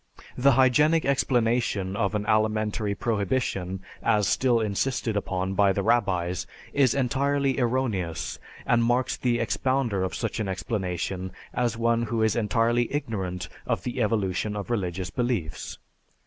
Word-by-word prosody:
The 135 Hz, +2 st, +4 dB
hygienic 150 Hz, +5 st, +4 dB
explanation 120 Hz, -7 st, +1 dB
of 105 Hz, 0 st, 0 dB
an 105 Hz, 0 st, -1 dB
alimentary 110 Hz, -1 st, +1 dB
prohibition 100 Hz, -4 st, -1 dB, 0.2 s
as 105 Hz, -2 st, +2 dB
still 125 Hz, -3 st, +3 dB
insisted 110 Hz, +2 st, -1 dB
upon 95 Hz, -1 st, -1 dB
by 100 Hz, 0 st, +4 dB
the 100 Hz, -, -1 dB
rabbis 90 Hz, -6 st, +1 dB, 0.3 s
is 135 Hz, -4 st, +3 dB
entirely 140 Hz, +1 st, +1 dB
erroneous 115 Hz, -, -1 dB, 0.3 s
and 115 Hz, 0 st, +3 dB
marks 125 Hz, +2 st, +1 dB
the 120 Hz, -2 st, 0 dB
expounder 120 Hz, -2 st, 0 dB
of 95 Hz, -, -2 dB
such 115 Hz, -1 st, -3 dB
an 110 Hz, -, -1 dB
explanation 95 Hz, -2 st, -3 dB, 0.2 s
as 120 Hz, -2 st, 0 dB
one 115 Hz, 0 st, +2 dB
who 115 Hz, -1 st, 0 dB
is 110 Hz, +1 st, +2 dB
entirely 115 Hz, +1 st, +1 dB
ignorant 100 Hz, -11 st, -3 dB, 0.2 s
of -, -, -1 dB
the 125 Hz, 0 st, -3 dB
evolution 105 Hz, -1 st, 0 dB
of 105 Hz, +3 st, -5 dB
religious 95 Hz, -4 st, -2 dB
beliefs. 120 Hz, -, -2 dB
115 Hz, 135 wpm, -26 LUFS, 95-125 Hz, 0.3 s, The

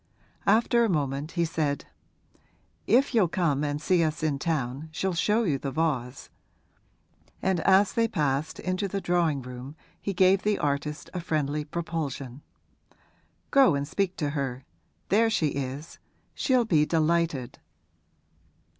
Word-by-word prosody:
After 235 Hz, +3 st, +4 dB
a 230 Hz, -, +2 dB
moment 145 Hz, -2 st, -1 dB
he 170 Hz, -1 st, +1 dB
said, 150 Hz, -3 st, -1 dB, 1.0 s
'If 255 Hz, +5 st, +3 dB
you'll 215 Hz, -6 st, +4 dB
come 160 Hz, -5 st, 0 dB
and 145 Hz, 0 st, -1 dB
see 175 Hz, +2 st, +2 dB
us 155 Hz, 0 st, -2 dB
in 145 Hz, -3 st, 0 dB
town 140 Hz, -1 st, -2 dB
she'll 190 Hz, +4 st, -1 dB
show 210 Hz, +7 st, +2 dB
you 150 Hz, -9 st, 0 dB
the 140 Hz, -, -3 dB
vase.' 135 Hz, -4 st, -2 dB, 1.1 s
And 190 Hz, -2 st, 0 dB
as 190 Hz, +3 st, +4 dB
they 230 Hz, 0 st, +2 dB
passed 145 Hz, -5 st, -1 dB
into 185 Hz, +2 st, -1 dB
the 195 Hz, +1 st, -3 dB
drawing 170 Hz, -7 st, +1 dB
room 125 Hz, +3 st, -8 dB, 0.3 s
he 200 Hz, -, -2 dB
gave 190 Hz, +1 st, +4 dB
the 210 Hz, -1 st, +1 dB
artist 150 Hz, +1 st, -2 dB
a 180 Hz, -, -3 dB
friendly 150 Hz, -3 st, -1 dB
propulsion. 150 Hz, -5 st, -4 dB, 1.1 s
'Go 270 Hz, -, +5 dB
and 140 Hz, 0 st, -2 dB
speak 190 Hz, +2 st, -1 dB
to 145 Hz, -3 st, -1 dB
her; 135 Hz, -3 st, -3 dB, 0.4 s
there 225 Hz, +3 st, +4 dB
she 175 Hz, -9 st, +1 dB
is 140 Hz, +3 st, -5 dB, 0.3 s
she'll 255 Hz, -3 st, +2 dB
be 160 Hz, -8 st, +3 dB
delighted.' 160 Hz, -4 st, 0 dB
160 Hz, 140 wpm, -27 LUFS, 140-190 Hz, 1.1 s, Go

